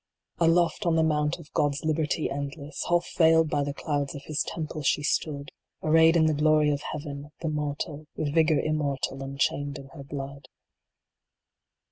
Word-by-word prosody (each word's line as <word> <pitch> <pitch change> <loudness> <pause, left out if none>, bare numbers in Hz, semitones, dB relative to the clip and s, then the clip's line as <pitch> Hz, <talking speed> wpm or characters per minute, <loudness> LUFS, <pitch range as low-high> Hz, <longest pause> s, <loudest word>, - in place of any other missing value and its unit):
Aloft 170 0 +3
on 165 - +3
the 160 - +4
mount 150 -1 +1
of 155 -3 -14
God 145 -2 +2
s 150 - -6
liberty 155 0 0
endless, 140 +2 -5
Half 175 0 +2
veiled 160 -1 +5
by 145 - +1
the 140 - -2
clouds 145 -2 -2
of 140 - -8
His 155 -1 -2
temple 155 -2 -4
she 145 +1 +1
stood, 145 -1 -1 0.3
Arrayed 160 +1 +5
in 160 - +4
the 155 - +3
glory 150 0 +3
of 145 0 -1
Heaven, 145 -1 -6
the 165 - -1
mortal, 150 0 -3
With 145 -2 -2
vigor 160 -1 +4
Immortal 140 -3 -1
unchained 140 +1 -1
in 135 -1 -11
her 140 -1 -10
blood. 140 -1 -7
150 Hz, 170 wpm, -27 LUFS, 140-160 Hz, 0.3 s, veiled